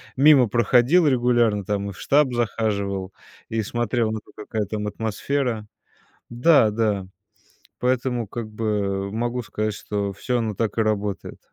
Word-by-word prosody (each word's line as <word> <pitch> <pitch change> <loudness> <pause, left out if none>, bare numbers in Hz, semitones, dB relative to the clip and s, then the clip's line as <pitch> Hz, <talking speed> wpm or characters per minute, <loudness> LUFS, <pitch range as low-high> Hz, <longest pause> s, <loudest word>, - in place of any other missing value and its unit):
мимо 135 -3 +6
проходил 125 - +4
регулярно 120 -6 +2
там. 100 -1 -2
И - - -5
в - - -16
штаб 140 -3 +3
захаживал, 100 -5 -1 0.4
и 110 -1 -1
смотрел 120 0 -1
на 110 - -3
то, - - -21
какая 105 0 -3
там 105 0 -3
атмосфера. 110 +2 -2 0.6
Да-да, 110 - +3 0.7
поэтому 125 -2 0
как 110 0 -6
бы 100 -3 -2
могу 120 +2 -2
сказать 110 +1 -2
что 100 -1 -3
всё 125 +5 -2
оно 110 -3 -2
так 115 +1 -2
и - - +3
работает. 105 -3 -2
110 Hz, 140 wpm, -23 LUFS, 105-120 Hz, 0.7 s, мимо